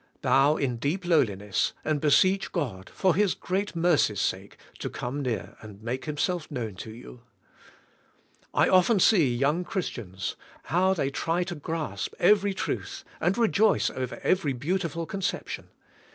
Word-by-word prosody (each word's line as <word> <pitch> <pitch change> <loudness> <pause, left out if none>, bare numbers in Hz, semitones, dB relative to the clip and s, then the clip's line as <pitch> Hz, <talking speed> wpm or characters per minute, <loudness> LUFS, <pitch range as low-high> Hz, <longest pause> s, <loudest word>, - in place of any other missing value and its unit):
Bow 140 +3 +4
in 125 -4 -1
deep 160 +10 -2
lowliness, 105 - +1
and 155 -2 0
beseech 185 +6 +3
God, 115 - -3
for 185 -2 +2
His 200 +1 +2
great 195 +1 -2
mercy's 165 - +2
sake, 95 +1 -2 0.2
to - - -3
come 130 +4 -4
near 110 -9 -3
and 105 -2 -11
make 125 +3 -3
Himself 155 +2 -2
known 120 -7 -4
to 110 - -7
you. 120 +2 -11 1.3
I - - +3
often 190 +3 +4
see 170 - +5
young 145 +8 +1
Christians, 110 - -4 0.3
how 185 +3 +2
they 140 -5 -1
try 165 +5 0
to 175 - -5
grasp 150 - -4
every 200 +1 +4
truth - - -4 0.2
and 180 +4 +1
rejoice 220 -2 +3
over 130 -1 -5
every 170 -7 +2
beautiful 165 +4 -2
conception. 195 +3 -4
155 Hz, 145 wpm, -27 LUFS, 120-185 Hz, 1.3 s, see